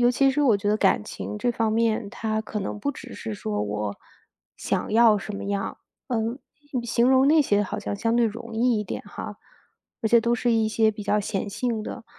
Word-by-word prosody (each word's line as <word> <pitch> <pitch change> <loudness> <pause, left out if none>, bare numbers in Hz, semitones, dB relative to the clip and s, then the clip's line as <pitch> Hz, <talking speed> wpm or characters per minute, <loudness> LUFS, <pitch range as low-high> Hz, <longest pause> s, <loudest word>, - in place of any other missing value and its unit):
尤 245 0 +5
其 270 +2 +3
是 280 +2 0
我 240 -7 +5
觉 200 +1 -2
得 210 - +3
感 215 - +3
情 210 - -6
这 240 +3 +1
方 225 -1 0
面， 225 -1 +1
它 220 -2 -2
可 220 0 -5
能 195 - -4
不 285 - 0
只 255 -1 -10
是 220 -2 -5
说 105 - -2
我 105 0 -3 0.6
想 - - -1
要 225 -1 +6
什 205 +1 -6
么 - - -6
样， 200 0 -2 0.3
呃， 250 - 0 0.7
形 235 +1 +2
容 265 +1 +5
那 310 0 +6
些 205 -6 +2
好 190 - -4
像 - - -3
相 230 +3 +1
对 240 - +4
容 230 +1 -6
易 235 0 +2
一 210 - -4
点 - - -5
哈。 - - -7 0.6
而 220 - +2
且 235 +1 +6
都 235 +1 +1
是 240 0 +1
一 225 -1 +2
些 220 0 +3
比 210 0 -8
较 210 +1 +1
显 205 0 -2
性 230 +1 -2
的， 220 - -7
220 Hz, 240 characters per minute, -25 LUFS, 210-240 Hz, 0.7 s, 要